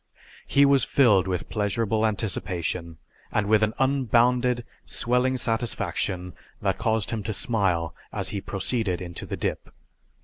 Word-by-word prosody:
He 140 0 +5
was 140 -3 +5
filled 105 -9 +4
with 90 -1 -2
pleasurable 110 +1 0
anticipation, 90 -5 -2 0.3
and 105 - +1
with 110 +1 +4
an 110 0 +1
unbounded 125 -2 +2 0.2
swelling 125 +2 +1
satisfaction 110 -6 -2 0.3
that 95 -1 -1
caused 110 -2 0
him 115 -2 -2
to 110 +2 -3
smile 95 -7 0 0.2
as - - -1
he 100 - -3
proceeded 100 -2 -1
into 85 -2 -6
the - - -4
dip. - - -3
110 Hz, 135 wpm, -25 LUFS, 95-120 Hz, 0.3 s, He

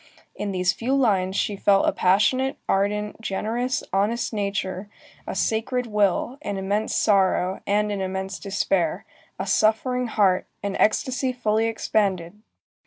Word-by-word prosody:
In 205 -1 -3
these 180 -1 +1
few 255 +4 -1
lines 195 -8 +2
she 205 - 0
felt 195 0 +3
a - - +4
passionate, 220 +9 +2
ardent, 210 +2 0
generous, 235 +6 -2
honest 215 +5 0
nature, 200 -1 -3 0.4
a - - -4
sacred 240 +3 0
will, 210 +4 0
an 205 -6 -4
immense 200 +3 -1
sorrow, 190 -2 +2
and 210 +1 +1
an 200 -1 -2
immense 190 +1 -4
despair, 195 -4 -1 0.3
a - - -3
suffering 250 +3 +1
heart, 200 -5 +2 0.2
an 200 -1 -2
ecstasy 255 +4 +1
fully 225 -2 0
expanded. 205 -4 -1
205 Hz, 135 wpm, -24 LUFS, 195-225 Hz, 0.4 s, a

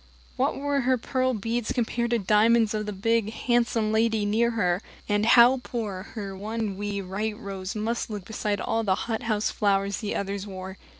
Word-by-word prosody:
What - - 0
were 285 0 0
her 255 +1 +2
pearl 255 +1 0
beads 225 +2 -2
compared 235 -1 0
to 235 - +2
the 200 - -6
diamonds 220 +2 +4
of 215 -1 -2
the - - -2
big, 220 +2 0
handsome 235 -2 +1
lady 220 -1 +2
near 225 +3 +2
her? 185 -5 0 0.3
And 205 +1 +1
how 240 +2 +7
poor 215 -7 -4
her 200 -3 -5
one 215 +1 -3
wee 200 0 -3
white 210 +3 -3
rose 195 -2 -6
must 225 +3 -2
look 205 -4 -6
beside 210 -1 -2
all 225 +3 0
the 190 -3 +2
hothouse 220 -2 -1
flowers 200 -1 +1
the 210 -3 -3
others 200 0 -3
wore! 190 0 -8
215 Hz, 185 wpm, -26 LUFS, 200-230 Hz, 0.3 s, how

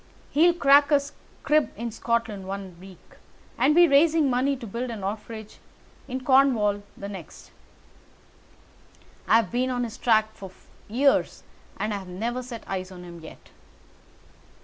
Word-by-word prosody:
He'll 340 +4 +4
crack 285 -1 +5
a 290 - +6 0.4
crib 305 -1 +2
in 235 +1 -4
Scotland 225 -4 -2
one 195 -2 -6
week, 190 -1 -16 0.4
and 275 +6 +3
be 345 0 +7
raising 305 0 +4
money 260 +3 +1
to 245 - -9
build 235 +4 -4
an 220 -4 -6
orphanage 215 +2 -6 0.5
in 260 0 -5
Cornwall 245 -7 +3 0.2
the 200 - -7
next. 190 -6 -11 1.8
I've 225 -1 +3
been 250 +2 0
on 245 -1 -1
his 230 -2 -6
track 220 -2 +2
for 195 - -10 0.4
years 270 +6 +1 0.3
and 215 0 -2
have 195 -2 -6
never 230 +8 -3
set 240 -2 -8
eyes 185 -1 -5
on 180 -1 -10
him 170 -1 -10
yet." 160 - -14
230 Hz, 145 wpm, -25 LUFS, 200-270 Hz, 1.8 s, be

